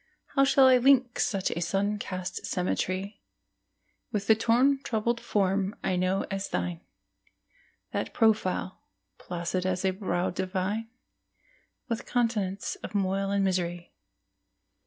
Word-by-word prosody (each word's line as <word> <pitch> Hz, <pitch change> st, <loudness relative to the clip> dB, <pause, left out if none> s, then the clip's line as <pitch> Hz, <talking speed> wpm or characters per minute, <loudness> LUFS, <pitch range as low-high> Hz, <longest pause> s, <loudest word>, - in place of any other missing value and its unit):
How 275 Hz, -, +4 dB
shall 270 Hz, 0 st, +5 dB
I 260 Hz, -1 st, +7 dB
link 255 Hz, -1 st, +4 dB
such 195 Hz, -3 st, 0 dB
sun 200 Hz, +4 st, 0 dB
cast 185 Hz, -2 st, -5 dB
symmetry 185 Hz, +2 st, -2 dB, 0.9 s
With 205 Hz, -3 st, -2 dB
the 220 Hz, -, +6 dB
torn 245 Hz, +5 st, +3 dB
troubled 235 Hz, -1 st, -1 dB
form 195 Hz, 0 st, 0 dB
I 185 Hz, -, +1 dB
know 185 Hz, +2 st, +1 dB
as 195 Hz, 0 st, -3 dB
thine, 175 Hz, -2 st, -2 dB, 1.1 s
That -, -, -2 dB
profile, 215 Hz, -4 st, +1 dB, 0.4 s
placid 180 Hz, +1 st, -3 dB
as 185 Hz, 0 st, -1 dB
a 190 Hz, -, +3 dB
brow 185 Hz, -2 st, -1 dB
divine, 190 Hz, +4 st, -2 dB, 1.0 s
With 230 Hz, -2 st, -3 dB
continents 210 Hz, -6 st, 0 dB
of -, -, -8 dB
moil 195 Hz, 0 st, 0 dB
and 200 Hz, 0 st, +1 dB
misery? 175 Hz, -2 st, -2 dB
195 Hz, 120 wpm, -28 LUFS, 185-225 Hz, 1.1 s, I